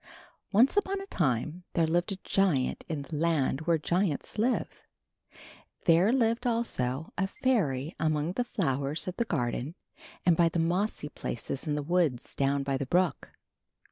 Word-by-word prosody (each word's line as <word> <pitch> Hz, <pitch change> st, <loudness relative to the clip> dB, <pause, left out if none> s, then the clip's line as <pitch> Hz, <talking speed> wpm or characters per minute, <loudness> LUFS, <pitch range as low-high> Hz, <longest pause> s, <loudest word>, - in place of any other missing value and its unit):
Once 235 Hz, -, +5 dB
upon 395 Hz, -1 st, +1 dB
a 390 Hz, -, -7 dB
time 155 Hz, -, -1 dB
there 165 Hz, -, +3 dB
lived 175 Hz, +4 st, 0 dB
a 195 Hz, -, -3 dB
giant 180 Hz, -10 st, +1 dB
in 150 Hz, -3 st, -3 dB
the 145 Hz, +3 st, -7 dB
land 150 Hz, -3 st, +1 dB
where 170 Hz, -1 st, +4 dB
giants 175 Hz, +3 st, -1 dB
live. 245 Hz, +4 st, 0 dB, 1.0 s
There 175 Hz, +6 st, +5 dB
lived, 240 Hz, -1 st, +1 dB
also, 160 Hz, -, -1 dB
a 195 Hz, -, +2 dB
fairy 165 Hz, -, 0 dB
among 155 Hz, 0 st, 0 dB
the 245 Hz, +7 st, -1 dB
flowers 145 Hz, -, -1 dB
of 185 Hz, -, -4 dB
the 235 Hz, -, +1 dB
garden 135 Hz, -, -2 dB, 0.5 s
and 175 Hz, -2 st, +4 dB
in 170 Hz, -1 st, +5 dB
the -, -, 0 dB
mossy 170 Hz, -1 st, 0 dB
places 135 Hz, +5 st, -5 dB
in 150 Hz, -, 0 dB
the 150 Hz, -, -2 dB
woods 160 Hz, -6 st, 0 dB
down 140 Hz, 0 st, +1 dB
by 135 Hz, -1 st, -1 dB
the 140 Hz, -, -3 dB
brook. 180 Hz, +4 st, 0 dB
165 Hz, 160 wpm, -29 LUFS, 140-195 Hz, 1.0 s, Once